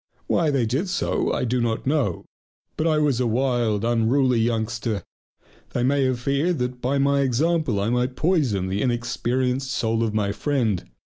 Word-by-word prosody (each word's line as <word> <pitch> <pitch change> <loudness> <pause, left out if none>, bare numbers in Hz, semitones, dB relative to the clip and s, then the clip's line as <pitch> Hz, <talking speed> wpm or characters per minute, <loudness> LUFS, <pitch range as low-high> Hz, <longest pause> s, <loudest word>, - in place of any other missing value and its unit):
Why 165 -3 +1
they 135 -5 +1
did 135 - -1
so 180 - 0
I - - -1
do 125 +1 0
not 115 -1 -1
know. 130 - 0 0.5
But 160 - 0
I 155 -1 +2
was 145 -5 +2
a 125 - +1
wild, 115 -3 0
unruly 120 +2 +2
youngster; 110 -2 -1 0.7
they 120 - 0
may 135 +1 +2
have 130 -2 0
feared 140 +7 0
that 125 -1 -3
by 135 +3 0
my 140 0 +2
example 140 -2 +1
I 105 +3 0
might 125 +1 0
poison 140 - +1
the 95 +2 -2
inexperienced 125 +2 -1
soul 115 -2 0
of 110 -2 -1
my 100 -2 +1
friend. 115 - -1
125 Hz, 170 wpm, -23 LUFS, 115-140 Hz, 0.7 s, I